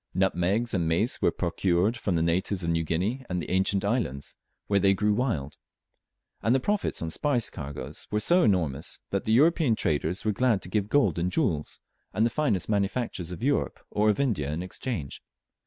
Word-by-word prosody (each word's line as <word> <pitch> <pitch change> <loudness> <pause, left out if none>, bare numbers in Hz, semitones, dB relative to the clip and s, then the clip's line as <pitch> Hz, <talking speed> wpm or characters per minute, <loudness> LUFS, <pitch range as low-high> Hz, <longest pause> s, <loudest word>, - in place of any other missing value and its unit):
Nutmegs 95 +5 +1
and 85 -4 0
mace 85 +9 0
were - - +4
procured 90 +4 0
from 100 -6 -2
the 80 - +1
natives 90 +3 0
of 85 - 0
New 80 0 +1
Guinea 95 - -1
and 90 -1 -1
the 80 - -4
adjacent 95 +3 0
islands, 100 - -2 0.3
where 100 -1 +2
they 95 0 +4
grew 105 +2 +1
wild; 105 - -2 0.8
and 115 +3 +2
the - - +3
profits 205 - -1
on 80 - -3
spice 125 - +1
cargoes 70 -3 -7
were 105 - 0
so 175 - +4
enormous, 80 - 0
that - - -1
the 110 - 0
European 150 -1 +4
traders 80 +3 -1
were 110 - +3
glad 110 -2 +1
to - - -5
give 105 0 -1
gold 105 - +2
and 90 +2 -1
jewels, 85 - -1 0.4
and 110 - +3
the 115 - +1
finest 110 - 0
manufactures 100 -3 -1
of 90 +5 -7
Europe 140 +2 0
or 105 +1 +2
of 105 - +1
India, 100 - 0
in 80 +4 -3
exchange. 90 - -5
100 Hz, 190 wpm, -27 LUFS, 85-115 Hz, 0.8 s, were